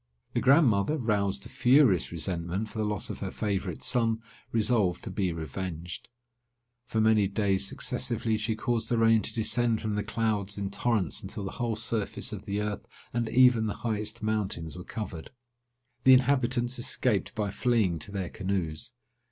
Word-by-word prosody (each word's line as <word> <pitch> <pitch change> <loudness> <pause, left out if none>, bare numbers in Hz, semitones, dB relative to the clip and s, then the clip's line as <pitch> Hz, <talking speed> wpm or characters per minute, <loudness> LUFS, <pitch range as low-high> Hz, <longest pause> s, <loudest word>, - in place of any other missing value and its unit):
The - - +1
grandmother, 135 -2 +4
roused 100 -5 0
to - - -9
furious 125 - +4
resentment 85 +5 -2
for 110 - -6
the 110 - +1
loss 105 -3 -2
of - - -7
her - - -3
favourite 100 -5 -3
son, 115 -3 +2 0.3
resolved 105 -6 +1
to - - -5
be 95 -3 0
revenged. 85 +2 -6 0.8
For 110 - -1
many 110 -2 +4
days 100 -1 +1
successively 115 0 -1
she 110 +1 -1
caused 115 0 -1
the 120 - +1
rain 115 -1 +5
to - - -1
descend 115 0 +1
from 110 -1 -2
the 105 0 -1
clouds 105 -3 -1
in 100 -1 -3
torrents, 100 -5 0
until 100 - -5
the 95 - -4
whole 120 -3 -2
surface 110 -1 -2
of - - -7
the 100 +1 -2
earth, 105 -1 -4 0.3
and 115 -1 -1
even 125 -3 +5
the 105 - -3
highest 110 0 -2
mountains, 100 -7 -2
were 90 - -7
covered. 105 -8 -6 0.7
The 130 - +8
inhabitants 125 -1 +2
escaped 115 -4 0
by 105 -3 -1
fleeing 105 -8 +1
to 100 - -6
their 95 -3 -3
canoes. 95 -6 -3
105 Hz, 170 wpm, -28 LUFS, 95-115 Hz, 0.8 s, The